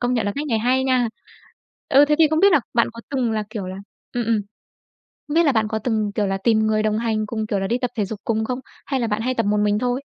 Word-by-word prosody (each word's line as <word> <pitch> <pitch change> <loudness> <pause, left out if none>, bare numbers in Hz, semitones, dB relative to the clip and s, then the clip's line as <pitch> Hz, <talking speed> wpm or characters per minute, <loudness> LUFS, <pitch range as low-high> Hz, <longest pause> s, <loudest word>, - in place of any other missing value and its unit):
Công 245 0 0
nhận 220 -4 0
là 205 - 0
cách 295 +2 -3
này 225 -3 +1
hay 255 +3 +1
nha! 255 -3 +2 0.8
Ừ, 285 0 +6
thế 300 - +4
thì 315 -2 +6
không 315 +2 +1
biết 400 -1 +6
là 295 - +5
bạn 235 - +3
có 230 - -9
từng 250 -5 0
là, 215 -1 -1
kiểu 210 -5 -5
là 185 +1 -6 0.4
ừm, 240 -1 -1
ừm, 225 -1 +2 0.9
không 295 - -3
biết 335 +1 +5
là 280 - +4
bạn 220 -2 +1
có 220 0 -1
từng, 215 -2 -1
kiểu 210 -2 +1
là, 195 0 -1
tìm 225 -2 +4
người 215 0 +1
đồng 215 0 +1
hành 225 -2 0
cùng, 220 -1 -3
kiểu 205 -2 -1
là, 195 - -1
đi 240 +5 0
tập 250 -2 -2
thể 210 - +1
dục 205 +1 -6
cùng 220 -1 0
không? 255 +2 -3 0.3
Hay 270 -2 -1
là 235 - 0
bạn 210 0 -1
hay 255 +1 -1
tập 230 -3 0
một 210 +1 +2
mình 210 0 +2
thôi? 250 +3 -1
230 Hz, 295 wpm, -22 LUFS, 215-255 Hz, 0.9 s, Ừ